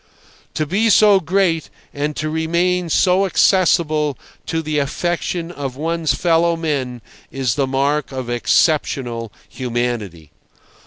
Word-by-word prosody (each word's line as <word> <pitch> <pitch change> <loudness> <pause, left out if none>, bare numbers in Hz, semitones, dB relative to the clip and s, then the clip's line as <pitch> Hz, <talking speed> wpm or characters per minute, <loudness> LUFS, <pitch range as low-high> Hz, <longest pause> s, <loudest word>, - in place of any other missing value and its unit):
To 155 - 0
be 200 +9 +1
so 205 -1 +6
great 180 -1 0 0.2
and 145 +1 -3
to 155 - -3
remain 170 +3 0
so 185 +4 +3
accessible 155 -6 +2 0.3
to 165 0 -2
the 150 -1 -1
affection 170 +3 -2
of 140 -6 -5
one's 160 -1 -1
fellow 170 +2 +2
men 135 -7 -3 0.3
is 130 -4 -1
the 135 +2 0
mark 140 +3 0
of 130 -2 -5
exceptional 120 -2 0 0.2
humanity. 115 - -4
155 Hz, 120 wpm, -19 LUFS, 130-170 Hz, 0.3 s, so